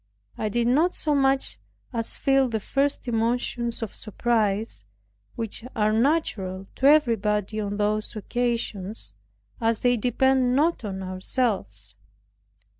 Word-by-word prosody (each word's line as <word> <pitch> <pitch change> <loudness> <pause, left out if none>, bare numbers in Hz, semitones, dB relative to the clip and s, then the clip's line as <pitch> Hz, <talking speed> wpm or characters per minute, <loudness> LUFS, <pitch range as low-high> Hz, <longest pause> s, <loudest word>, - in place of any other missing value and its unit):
I 215 - -2
did 235 +3 0
not 305 +9 +3
so 300 - 0
much 270 -1 +1 0.3
as 230 -1 -3
feel 270 -1 +3
the 220 -1 -1
first 275 +5 -1
emotions 235 0 -1
of 220 - -5
surprise, 215 - -1 0.5
which 225 -1 -3
are 215 -1 +2
natural 220 - 0
to 270 - +4
everybody 215 -8 +3
on 205 -1 -3
those 210 +1 -1
occasions, 220 - -3 0.5
as 225 -1 +1
they 245 -1 +3
depend 255 +2 +2
not 315 0 +2
on 190 -2 -4
ourselves. 185 - -2
230 Hz, 120 wpm, -25 LUFS, 210-255 Hz, 0.5 s, to